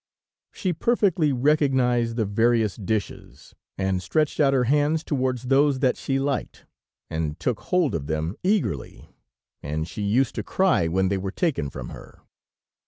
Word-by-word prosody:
She 185 -4 -2
perfectly 180 -5 +2
recognized 130 -4 +2
the 115 -2 0
various 110 -1 +2
dishes, 105 0 -5 0.2
and 95 -1 0
stretched 150 - 0
out 140 -3 +4
her 130 -2 +2
hands 150 +5 +2
towards 130 -5 -1
those 135 +2 +3
that 130 -1 +2
she 135 - -2
liked, 140 +1 -3 0.5
and 80 -2 -3
took 125 -4 -1
hold 180 -5 +1
of 75 -4 -3
them 80 +4 -2
eagerly, 175 - -2 0.5
and 80 +2 -3
she 105 - -7
used 110 +5 +1
to - - -4
cry 185 - +2
when 95 +3 +1
they 100 0 0
were 95 +1 -3
taken 135 - -1
from 65 -3 -7
her. - - -13
125 Hz, 155 wpm, -24 LUFS, 95-145 Hz, 0.5 s, out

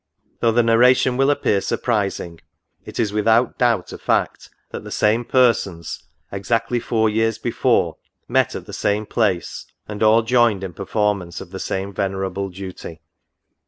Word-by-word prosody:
Though 115 - +3
the 120 +1 +3
narration 125 +2 +4
will 135 +2 +2
appear 105 -8 +1
surprising, 100 -9 -2 0.4
it - - -8
is 105 -3 0
without 110 +3 +2
doubt 115 -7 +1
a - - -8
fact, - - -1 0.2
that - - -6
the - - -9
same 110 +3 +1
persons, 105 - +1 0.4
64. 100 - -4
NOTES. - - -5
exactly 115 +3 0
four 110 -1 +1
years 110 +1 0
before, 115 +1 0 0.3
met - - +1
at - - -6
the - - -11
same 105 +1 0
place, 100 -5 -1 0.2
and 105 -1 -7
all 110 +1 +5
joined 115 -4 +2
in 95 -2 -5
performance 100 -2 -2
of 90 - -10
the 95 - -6
same 95 +1 -3
venerable 95 0 -2
duty." 95 -3 -9
105 Hz, 160 wpm, -21 LUFS, 95-115 Hz, 0.4 s, all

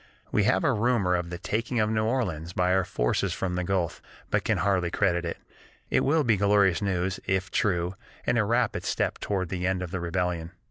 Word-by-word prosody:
"We - - +2
have - - +3
a - - +3
rumor 105 -5 +2
of 85 -1 -2
the 85 - -5
taking 115 +6 -2
of 105 - +3
New 110 0 +1
Orleans 95 -9 -1
by 90 0 +2
our 95 0 +3
forces - - 0
from 95 -2 -2
the 90 0 -1
Gulf, 90 -2 -1 0.3
but - - +2
can 110 - +1
hardly 95 -3 +1
credit 85 -2 +1
it. 85 - -3 0.5
It - - +4
will 155 +2 +3
be 115 -5 +3
glorious 100 -2 +3
news, 95 -1 -1
if 95 -1 0
true, 90 -4 +1 0.3
and 120 - +2
a - - +4
rapid 115 +1 +1
step - - -1
toward 95 -4 -2
the 90 0 -2
end 95 -1 0
of 90 - -6
the 95 - -2
rebellion.... 85 -1 -2
95 Hz, 215 wpm, -27 LUFS, 90-105 Hz, 0.5 s, It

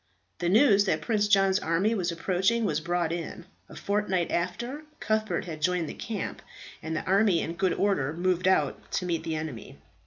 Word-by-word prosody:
The 175 0 0
news 205 -1 +5
that 160 -5 0
Prince 210 -3 +1
John's 195 -2 +4
army 170 +7 +1
was 180 -5 -1
approaching 190 +7 +1
was 155 -6 0
brought 170 0 -1
in, 170 0 -5 0.2
a - - -11
fortnight 200 -4 -1
after 240 - -2 0.2
Cuthbert 215 0 -1
had 155 -3 -7
joined 180 -1 +1
the - - -6
camp, 220 -4 -5 0.4
and 160 +1 -4
the 155 - -3
army 195 -1 +3
in 165 - -3
good 185 +1 +1
order 190 -9 +1
moved 180 +2 0
out 155 -7 +1
to 180 - -1
meet 170 -2 -1
the 160 -1 -2
enemy. 155 -8 -6
180 Hz, 185 wpm, -27 LUFS, 165-205 Hz, 0.4 s, news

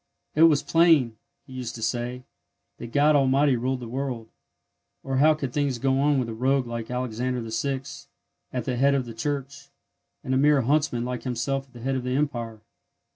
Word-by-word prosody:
"It 155 - +1
was 145 -3 +2
plain," 160 -9 +4 0.3
he 130 - -13
used 125 -2 -5
to 115 - -6
say, 120 +2 -2 0.6
"that 120 - -8
God 145 +2 +4
Almighty 135 0 +3
ruled 125 +2 -2
the 120 - -6
world, 125 -2 -4 0.7
or 135 -1 -2
how 155 +3 +5
could 135 -5 -5
things 140 -4 0
go 135 +2 +1
on 145 0 +3
with 125 -3 0
a 115 - -5
rogue 130 +3 +1
like 115 -1 -5
Alexander 125 0 -2
VI. 130 +4 -2 0.7
at 125 - -3
the 125 -2 -2
head 140 +2 +4
of 130 -2 0
the 115 - -8
Church, 140 +3 -4 0.5
and 130 -2 -2
a - - +3
mere 145 0 +4
huntsman 135 -3 +1
like 125 -1 -4
himself 135 +2 -2
at 130 - -28
the 120 - -11
head 135 +3 -1
of 130 -1 -2
the 125 +1 -1
Empire." 120 -6 -2
130 Hz, 195 wpm, -25 LUFS, 120-140 Hz, 0.7 s, how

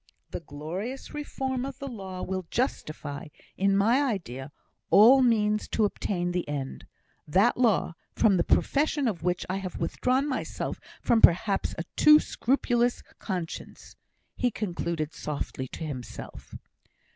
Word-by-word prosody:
The - - -4
glorious 180 - -6
reform 265 -3 -3
of 270 -1 -5
the 275 - -6
law 190 -7 -6
will 185 -2 -3
justify, 155 - -3 0.3
in 195 0 +2
my 230 +7 +4
idea, 150 - -3 0.4
all 245 +6 +8
means 215 -3 +2
to 220 - +1
obtain 175 -3 -2
the 175 -3 -2
end 140 -2 -5 0.4
that 195 +10 +4
law, 225 -8 +2 0.2
from 205 -4 +4
the 170 - +2
profession 290 - +2
of 195 -7 -2
which 180 0 -1
I 185 - -2
have 185 -2 -5
withdrawn 255 - 0
myself 265 - -3 0.2
from 230 -2 +3
perhaps 195 +3 +4
a 165 - -2
too 300 0 +8
scrupulous 245 -3 0 0.2
conscience!" 180 -5 -6 0.4
he 245 - +1
concluded 170 -7 -3
softly 140 -3 -4
to 165 - -8
himself. 135 -6 -8
200 Hz, 135 wpm, -27 LUFS, 170-245 Hz, 0.4 s, all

